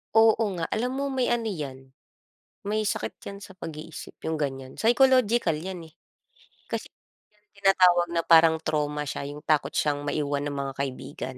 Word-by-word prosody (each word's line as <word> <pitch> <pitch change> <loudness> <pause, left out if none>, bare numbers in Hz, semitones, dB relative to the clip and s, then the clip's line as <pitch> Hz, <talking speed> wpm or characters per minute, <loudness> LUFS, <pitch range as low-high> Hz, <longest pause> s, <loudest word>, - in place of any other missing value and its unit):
Oo 225 0 +6
nga. 165 -2 -3
Alam 250 +3 -1
mo 275 +1 -2
may 260 -2 0
ano 230 -2 -1
'yan, 135 -7 -6 0.8
may 215 0 0
sakit - - -2
'yan 200 0 -7
sa 190 -1 -12
pag-iisip, 155 -1 -8 0.2
yung 160 - -1
ganiyan. 135 -3 -4
Psychological 240 - +4
'yan, 170 -1 -7
eh. - - -29 0.8
Kasi - - -3 0.5
yung 210 0 -36
tinatawag 180 -3 +5
na 170 - +2
parang 160 -1 +5
trauma 150 -1 -1
siya, 140 - -4
yung 150 +1 -8
takot 150 -2 +1
siyang 145 -1 0
maiwan 145 -1 -1
ng 145 - -3
mga 140 -1 -3
kaibigan. 130 -1 -5
160 Hz, 165 wpm, -26 LUFS, 145-210 Hz, 0.8 s, Oo